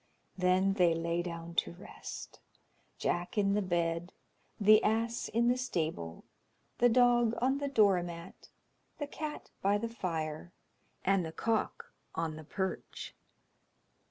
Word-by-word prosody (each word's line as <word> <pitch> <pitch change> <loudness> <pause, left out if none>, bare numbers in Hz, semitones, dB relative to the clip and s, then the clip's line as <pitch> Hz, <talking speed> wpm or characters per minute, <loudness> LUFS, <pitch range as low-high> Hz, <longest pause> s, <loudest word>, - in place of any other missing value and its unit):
Then 185 +1 +3
they 175 -4 +4
lay 170 +1 0
down 170 -1 -6
to - - +1
rest; 180 +3 -9 0.6
Jack 175 +4 -1
in 200 -1 +3
the 210 - +2
bed, 170 -1 -1 0.5
the 215 +1 +7
ass 230 +2 +1
in 235 +2 +2
the 245 +1 +3
stable, 155 - -3 0.6
the 245 - +6
dog 240 -1 +4
on 265 +3 +2
the 285 - -1
door 205 -9 +4
mat, 170 -1 -9 0.5
the 290 - -2
cat 300 +1 -6
by 200 +1 +3
the 230 +3 -2
fire, 165 -6 -4 0.5
and 195 -1 +3
the 160 - -4
cock 225 +6 -1 0.2
on 160 -1 -1
the 155 - -9
perch. 190 +4 -4
190 Hz, 135 wpm, -32 LUFS, 170-230 Hz, 0.6 s, the